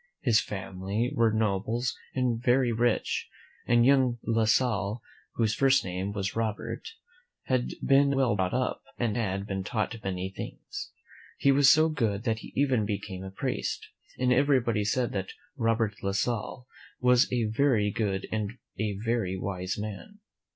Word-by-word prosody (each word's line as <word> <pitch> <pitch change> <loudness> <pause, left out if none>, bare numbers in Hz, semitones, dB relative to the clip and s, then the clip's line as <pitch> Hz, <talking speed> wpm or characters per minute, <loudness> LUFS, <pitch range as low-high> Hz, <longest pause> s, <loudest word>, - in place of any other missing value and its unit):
His 115 -5 +4
family 95 +4 -3
were 115 -1 +3
nobles 110 +3 0 0.2
and 130 -1 +2
were 120 -2 0
very 125 -1 +3
rich, 115 0 0 0.4
and 120 0 +5
young 130 -3 +4
La 115 -1 +2
Salle, 110 -2 +1 0.4
whose 110 -2 +1
first 135 -1 +3
name 95 +2 -3
was 100 -2 -3
Robert, 115 - -3 0.5
had 130 -2 -1
been 140 0 +4
well 130 -6 +2
brought 95 -2 0
up, 130 0 -1 0.2
and 115 -4 0
had 100 -4 -1
been 95 -2 -3
taught 110 +3 -2
many 95 0 -3
things. 410 - -7 0.5
He 140 - +4
was 140 0 +6
so 155 +1 +5
good 115 -9 -1
that 110 -3 0
he - - -10
even 130 -5 +2
became 100 -2 -4
a 95 - -6
priest, 95 - -3 0.3
and 125 0 +3
everybody 125 -5 +2
said 120 +3 0
that 95 -1 -4 0.2
Robert 115 -4 +1
La 100 0 -1
Salle 120 +4 -2 0.3
was 125 0 +4
a 120 -2 +1
very 110 -2 +2
good 100 -3 -1
and 110 0 -2 0.3
a 105 -2 -1
very 110 -4 -1
wise 95 -1 -3
man. 105 - -6
115 Hz, 160 wpm, -28 LUFS, 100-125 Hz, 0.5 s, was